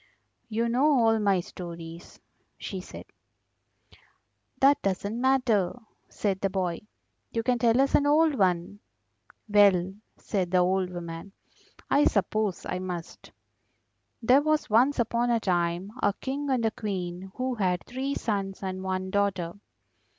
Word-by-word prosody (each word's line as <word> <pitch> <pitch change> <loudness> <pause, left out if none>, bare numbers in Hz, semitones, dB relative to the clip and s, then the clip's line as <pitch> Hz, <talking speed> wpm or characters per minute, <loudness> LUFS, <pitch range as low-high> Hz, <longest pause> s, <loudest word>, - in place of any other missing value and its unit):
"You 230 +1 0
know 250 +5 +2
all 225 -1 +3
my 200 -3 +2
stories," 170 -1 -9 0.4
she 190 -2 -6
said. - - -10 1.5
"That 280 +1 +5
doesn't 200 +4 -2
matter," 250 -8 +2 0.3
said 195 -2 -2
the 195 - +1
boy. 185 -3 -2 0.5
"You 230 - -2
can 245 0 +1
tell 235 +1 +3
us 275 0 +2
an 290 - +4
old 310 +1 +4
one." 185 -3 0 0.7
"Well," 195 -3 +4 0.2
said 190 -4 -2
the 185 - +2
old 185 +1 +2
woman, 175 +1 -7 0.5
"I 290 - +3
suppose 205 -1 0
I 185 - -3
must. 180 -3 -7 0.9
There 255 +5 +5
was 310 -5 0
once 250 +6 +4
upon 235 0 +1
a 235 -1 +3
time 175 0 -1
a 205 - +2
King 275 +5 -4
and 250 -4 +1
a 220 - +2
Queen 190 -3 -5
who 255 0 -2
had 185 -6 -1
three 265 +3 -3
sons 195 -3 -3
and 185 0 -4
one 190 0 -3
daughter." 190 -4 0
200 Hz, 140 wpm, -27 LUFS, 185-240 Hz, 1.5 s, That